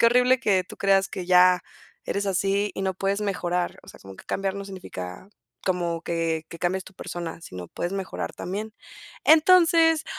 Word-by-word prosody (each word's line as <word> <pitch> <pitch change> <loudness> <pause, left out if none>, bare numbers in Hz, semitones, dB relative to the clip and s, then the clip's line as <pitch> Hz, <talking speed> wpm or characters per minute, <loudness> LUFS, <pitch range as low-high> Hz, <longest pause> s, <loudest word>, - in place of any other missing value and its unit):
Qué 230 - +6
horrible 250 +2 +4
que 190 -5 +2
tú - - -12
creas 195 -1 +3
que 180 - -6
ya 180 0 +6 0.4
eres 200 0 -1
así 195 +2 +1
y - - -4
no 190 -1 -1
puedes 195 +2 -1
mejorar. 180 -3 -1
O - - -18
sea, - - -13
como 95 0 -12
que - - -13
cambiar 195 -1 -2
no 200 0 -5
significa 180 - -8 0.3
como 175 -3 -1
que 165 -1 -2
que 170 - -10
cambies 185 +2 -1
tu 190 - -14
persona, 170 -2 -6
sino 90 - -8
puedes 175 - -4
mejorar 195 -3 -4
también. 210 +5 -5 0.5
Entonces, 325 -1 +5
190 Hz, 185 wpm, -25 LUFS, 175-205 Hz, 0.5 s, Qué